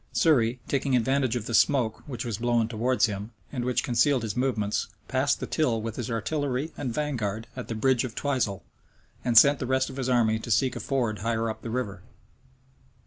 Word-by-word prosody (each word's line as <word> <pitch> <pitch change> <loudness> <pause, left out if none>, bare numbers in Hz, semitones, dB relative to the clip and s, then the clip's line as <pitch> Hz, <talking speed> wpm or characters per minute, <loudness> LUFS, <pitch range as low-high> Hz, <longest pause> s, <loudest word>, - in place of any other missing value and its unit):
Surrey, 125 -6 +3
taking 135 -1 +1
advantage 130 +1 +1
of 115 -3 -3
the 115 - -5
smoke, 120 -2 +3
which 125 -4 -5
was 115 -3 -3
blown 120 -1 +2
towards 120 +3 +1
him, 105 -1 -4 0.2
and 125 -3 -3
which 125 0 0
concealed 125 +1 +2
his 110 - -3
movements, 115 -5 0 0.2
passed 135 +2 +1
the - - -3
Till 125 -8 0
with 110 0 -5
his 120 -3 -4
artillery 140 +5 -2
and 130 -4 -3
vanguard 115 -6 -2
at 125 - -6
the 115 - -4
bridge 130 +2 +2
of 125 -3 -5
Twisel, 125 -9 -1 0.6
and 120 -2 +2
sent 140 +3 +7
the 130 - -3
rest 130 +1 +1
of 130 - -10
his 130 -1 -2
army 110 -3 +3
to 115 - -8
seek 125 +2 +2
a - - -4
ford 120 -7 -1
higher 115 +2 -1
up - - -10
the 115 - -6
river. 110 -6 -3
120 Hz, 200 wpm, -27 LUFS, 110-130 Hz, 0.6 s, sent